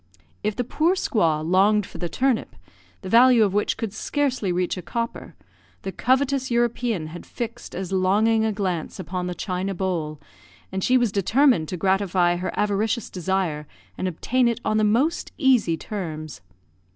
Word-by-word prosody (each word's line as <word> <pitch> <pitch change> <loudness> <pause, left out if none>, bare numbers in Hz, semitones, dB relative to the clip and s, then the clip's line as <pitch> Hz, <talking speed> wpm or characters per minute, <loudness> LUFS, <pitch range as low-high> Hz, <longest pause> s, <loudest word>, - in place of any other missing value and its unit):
If 210 0 -1
the 245 - -1
poor 315 +9 +1
squaw 165 - +1
longed 200 +3 +4
for 170 - -11
the 175 0 -3
turnip, 260 +2 0 0.5
the - - -6
value 240 +1 +6
of 200 -3 +1
which 205 +1 0
could 220 -4 -4
scarcely 255 -5 -1
reach 180 0 0
a 180 - -6
copper, 230 +6 -5 0.5
the 195 - -3
covetous 265 +5 +1
European 235 -6 0
had 175 - -8
fixed 235 -1 -6
as 185 0 -4
longing 210 +4 +3
a 220 - +1
glance 185 -6 -3
upon 180 -1 -4
the 180 - -4
china 190 +1 -3
bowl, 170 -5 -2 0.5
and 190 0 -3
she 255 - +4
was 240 -4 +1
determined 210 - +3
to 180 - -4
gratify 185 -2 +2
her 180 - -3
avaricious 210 +3 0
desire 180 -5 -2 0.3
and 185 - -2
obtain 245 +8 +1
it 235 -2 0
on 215 - +1
the 215 - +2
most 260 +11 +1
easy 250 - +3
terms. 155 - -6
200 Hz, 165 wpm, -24 LUFS, 180-235 Hz, 0.5 s, value